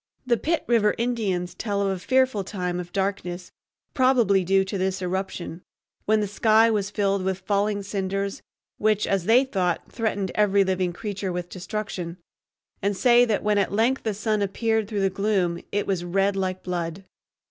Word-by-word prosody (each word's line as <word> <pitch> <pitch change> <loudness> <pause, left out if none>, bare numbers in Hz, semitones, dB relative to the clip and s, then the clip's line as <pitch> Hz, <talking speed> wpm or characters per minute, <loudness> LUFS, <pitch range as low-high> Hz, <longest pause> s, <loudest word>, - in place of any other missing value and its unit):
The 245 -2 +3
Pitt 325 +6 -1
River 225 -3 +3
Indians 205 -7 -1
tell 200 +2 -2
of 195 - +1
a 190 -1 -2
fearful 260 -1 +2
time 180 -2 -3
of 175 0 -7
darkness, 190 -2 -3 0.4
probably 240 -7 +3
due 190 +2 +3
to 190 0 -4
this 190 +1 0
eruption, 185 -2 -4 0.4
when 215 0 +3
the 205 - -1
sky 220 +2 +4
was 205 -2 0
filled 200 -2 0
with 190 0 -1
falling 205 +1 0
cinders 195 0 -3 0.4
which, 215 -1 +2
as 195 -3 0
they 235 +5 +5
thought, 185 -9 -1
threatened 205 -5 -1
every 200 -1 +3
living 185 -1 0
creature 200 0 -4
with 175 0 -4
destruction, 185 -3 -5 0.6
and 200 0 0
say 245 +1 +5
that 220 -4 0
when 210 -1 +2
at 195 - 0
length 230 +6 +2
the 220 -3 -2
sun 215 0 0
appeared 220 +2 0
through 210 -2 -2
the 195 -1 +2
gloom 190 -4 0
it 205 0 0
was 185 -3 -1
red 195 +3 +1
like 185 -1 -2
blood. 175 +1 -4
200 Hz, 175 wpm, -25 LUFS, 185-215 Hz, 0.6 s, they